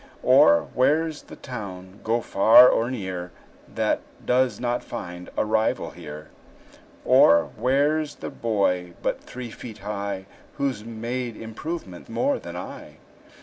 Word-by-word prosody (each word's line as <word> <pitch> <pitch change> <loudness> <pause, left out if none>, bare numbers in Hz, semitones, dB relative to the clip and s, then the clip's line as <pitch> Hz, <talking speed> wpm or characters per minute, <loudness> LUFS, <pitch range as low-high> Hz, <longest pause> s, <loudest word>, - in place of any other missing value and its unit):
Or, 85 0 +6
where's 155 +4 +2
the - - -12
town, 100 -6 -8
go 115 +2 +1
far 110 +5 +7
or 115 +1 +1
near, 95 -7 -5 0.4
That - - 0 0.2
does 125 0 +2
not 120 0 -1
find 90 0 -7
a - - +2
rival 110 +1 0
here? 75 +1 -10 0.8
Or, 85 0 +5
where 145 +4 +2
's 150 - -9
the - - -7
boy 90 -6 0
but - - -1
three 125 -2 -8
feet 110 -2 -9
high 100 -2 -4 0.3
Who's 135 -6 -1
made 115 +1 -4
improvement 115 - -7
more 275 - 0
than - - -9
I? - - -8
110 Hz, 135 wpm, -24 LUFS, 95-125 Hz, 0.8 s, far